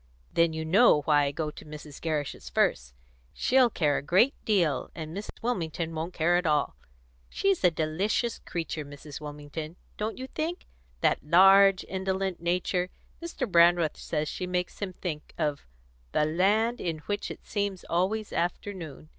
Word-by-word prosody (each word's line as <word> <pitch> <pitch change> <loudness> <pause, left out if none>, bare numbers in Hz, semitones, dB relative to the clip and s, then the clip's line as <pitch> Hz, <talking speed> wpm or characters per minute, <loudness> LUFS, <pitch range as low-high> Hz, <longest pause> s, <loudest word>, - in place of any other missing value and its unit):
"Then 170 -1 +3
you 160 0 -4
know 180 -1 +5
why 145 -1 +4
I 140 - 0
go 150 +1 -3
to - - -12
Mrs. 150 -1 -10
Gerrish's 155 -3 -3
first. - - 0 0.4
She'll 255 -1 +4
care 150 -9 +1
a - - -8
great 185 - +4
deal, 175 -10 +1
and 160 0 -6
Mrs. 205 +2 -8
Wilmington 165 -8 -2
won't 165 +3 -4
care 175 +2 +3
at 180 -1 0
all. 150 -2 +1 0.5
She's 390 - 0
a 180 - +7
delicious 175 +9 -1
creature, 165 -2 -4
Mrs. 145 +1 -10
Wilmington 150 +2 -7 0.2
don't 215 +1 -3
you 260 - -5
think? 320 +6 -4 0.4
That - - +2
large, 195 +4 +6
indolent 190 -1 -2
nature; 180 +1 0 0.3
Mr. 335 -5 -3
Brandreth 170 -3 +4
says 150 -1 -2
she 180 - -4
makes 180 0 -2
him 195 -3 -4
think 155 -5 -6
of 150 - -2 0.5
'the 150 - +3
land 205 +9 +2
in 165 -3 -2
which 205 0 -2
it - - -9
seemed 200 -3 -2
always 200 +5 0
afternoon.'" 170 -4 -4
175 Hz, 160 wpm, -28 LUFS, 155-195 Hz, 0.5 s, a